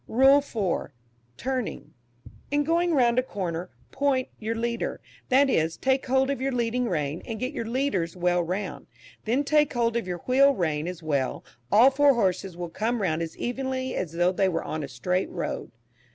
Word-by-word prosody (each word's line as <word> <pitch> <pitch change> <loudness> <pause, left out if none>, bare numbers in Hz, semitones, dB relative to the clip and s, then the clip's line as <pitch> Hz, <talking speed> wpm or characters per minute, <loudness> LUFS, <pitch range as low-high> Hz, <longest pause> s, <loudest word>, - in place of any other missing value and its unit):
RULE 270 +4 +6
IV. 210 - -2 0.5
TURNING. 255 -2 -4 0.6
In 290 +1 +2
going 335 +2 +2
round 240 -2 +4
a - - +4
corner, 180 -7 -4 0.2
"point" 270 -2 0
your 225 +1 -2
leader 235 +1 -2 0.3
that 275 +2 +5
is, 160 -10 +1
take 265 0 +1
hold 265 +1 +2
of 275 - -3
your 270 +1 0
leading 245 0 0
rein, 150 -2 -2
and 225 -2 -6
get 255 +5 -3
your 230 - -4
leaders 230 -10 -1
well 175 0 +2
round; 180 -4 -4 0.4
then 245 +6 +1
take 300 0 +3
hold 235 -1 +1
of 235 -5 -1
your 180 -1 -3
wheel 275 +2 +5
rein 155 -4 -1
as 180 -2 -6
well, 140 -4 -1 0.3
all 235 +6 +7
four 280 0 +4
horses 190 -4 0
will 175 -1 -4
come 225 +7 -1
round 160 -3 0
as 165 -1 -5
evenly 260 +1 -2
as 165 -3 -3
though 175 +2 +2
they 190 +1 +2
were 165 -2 -2
on 155 - -4
a 145 - -4
straight 180 +9 -1
road. 170 - -4
230 Hz, 185 wpm, -26 LUFS, 175-265 Hz, 0.6 s, all